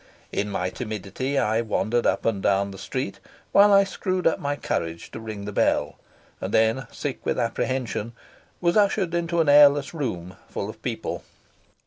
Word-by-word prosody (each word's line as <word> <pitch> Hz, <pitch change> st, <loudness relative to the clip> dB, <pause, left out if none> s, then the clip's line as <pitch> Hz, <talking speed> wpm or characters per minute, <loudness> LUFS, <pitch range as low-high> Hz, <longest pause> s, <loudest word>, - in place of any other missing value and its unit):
In 105 Hz, +1 st, -1 dB
my 90 Hz, -2 st, -2 dB
timidity 110 Hz, +4 st, -4 dB
I 110 Hz, -2 st, +2 dB
wandered 115 Hz, +1 st, 0 dB
up -, -, 0 dB
and 105 Hz, -4 st, +1 dB
down 100 Hz, +1 st, +2 dB
the 95 Hz, -, -10 dB
street 130 Hz, +2 st, -4 dB, 0.3 s
while 205 Hz, +1 st, +7 dB
I 200 Hz, 0 st, +7 dB
screwed 185 Hz, -1 st, -2 dB
up 165 Hz, -, +3 dB
my 145 Hz, 0 st, -1 dB
courage 85 Hz, -10 st, -3 dB
to -, -, -7 dB
ring 110 Hz, -2 st, -6 dB
the 105 Hz, -, -4 dB
bell; -, -, +1 dB, 0.4 s
and -, -, -3 dB
then, 110 Hz, +4 st, +2 dB
sick 145 Hz, -3 st, -5 dB
with -, -, -1 dB
apprehension, 120 Hz, -1 st, -2 dB, 0.5 s
was 170 Hz, -1 st, +2 dB
ushered 200 Hz, -4 st, +2 dB
into 170 Hz, 0 st, +1 dB
an 160 Hz, -, 0 dB
airless 145 Hz, 0 st, +6 dB
room 95 Hz, -, -4 dB
full -, -, -4 dB
of -, -, -20 dB
people. -, -, -4 dB
125 Hz, 170 wpm, -25 LUFS, 105-155 Hz, 0.5 s, while